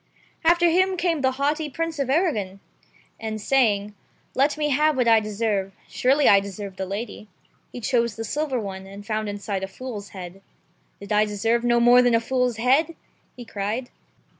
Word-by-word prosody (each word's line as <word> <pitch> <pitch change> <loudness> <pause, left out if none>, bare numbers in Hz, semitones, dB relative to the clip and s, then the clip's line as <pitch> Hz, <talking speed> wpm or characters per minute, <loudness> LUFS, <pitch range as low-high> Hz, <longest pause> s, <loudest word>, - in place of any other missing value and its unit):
After 345 +1 +4
him 370 +2 +2
came 340 -4 0
the 260 -1 +2
haughty 295 +3 -1
Prince 330 +2 -4
of 275 -2 -1
Arragon, 230 - 0 0.6
and 220 -1 -4
saying, 210 -4 +1 0.4
"Let 280 +3 +2
me^have 300 0 +2
what 250 -2 +1
I 225 -1 +6
deserve 210 -2 -2
— - - -31
surely 275 +3 +2
I 200 - +7
deserve 195 -1 -7
the 190 - -4
lady," 210 +2 -6 0.4
he - - -7
chose 235 -3 0
the 225 - -5
silver 275 +2 -2
one, 190 -2 -6
and 200 +1 -11
found 215 -1 -2
inside 200 -1 -4
a - - -2
fool's 210 -1 -8
head. 185 0 -9 0.6
"Did 200 +1 -10
I 210 0 +4
deserve 225 +3 0
no 240 0 +3
more 245 +1 +6
than 245 -2 +3
a - - +4
fool's 250 0 -1
head 275 +8 +2 0.2
?" - - -40
he 245 - -9
cried. 215 +5 -4
235 Hz, 185 wpm, -24 LUFS, 205-275 Hz, 0.6 s, I